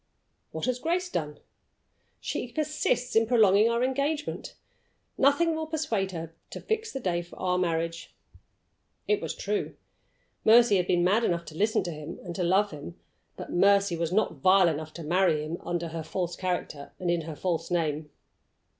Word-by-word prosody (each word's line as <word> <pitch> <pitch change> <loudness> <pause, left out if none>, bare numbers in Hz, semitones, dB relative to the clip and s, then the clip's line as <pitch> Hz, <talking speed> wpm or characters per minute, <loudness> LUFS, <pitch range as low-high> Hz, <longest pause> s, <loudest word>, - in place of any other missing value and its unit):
"What 160 - -3
has 250 0 -1
Grace 350 +5 -1
done?" 150 - -3 0.8
"She 245 - -4
persists 300 -3 -1
in 225 0 +4
prolonging 215 -2 +5
our 235 +1 +1
engagement. 280 +4 -2 0.6
Nothing 285 +5 +3
will 315 0 -3
persuade 295 -12 -1
her 165 -2 -6 0.2
to - - -7
fix 440 0 -2
the 270 - -4
day 175 -7 -1
for 175 - -13
our 180 -1 0
marriage." 165 -1 -2 1.0
It 420 -1 +2
was - - -4
true! 415 -2 -2 0.7
Mercy 225 -2 +6
had 180 -1 0
been 175 -1 +2
mad 205 +6 +3
enough 170 -4 0
to 155 - -10
listen 210 +5 +1
to 175 - -4
him, 155 +1 -7
and 175 - -6
to 180 - -2
love 195 +4 +3
him. 145 - -9 0.4
But - - -7
Mercy 200 0 +4
was 165 0 -2
not 215 +4 +1
vile 185 -1 +6
enough 155 0 -4
to 170 - -7
marry 165 -1 +2
him 165 +2 -4
under 170 -1 -3
her 165 0 -5
false 175 +2 -3
character, 175 -6 -4
and 175 -1 -1
in 170 -1 +1
her 160 -1 -7
false 165 0 -2
name. 155 -3 -1
185 Hz, 175 wpm, -28 LUFS, 165-240 Hz, 1.0 s, Mercy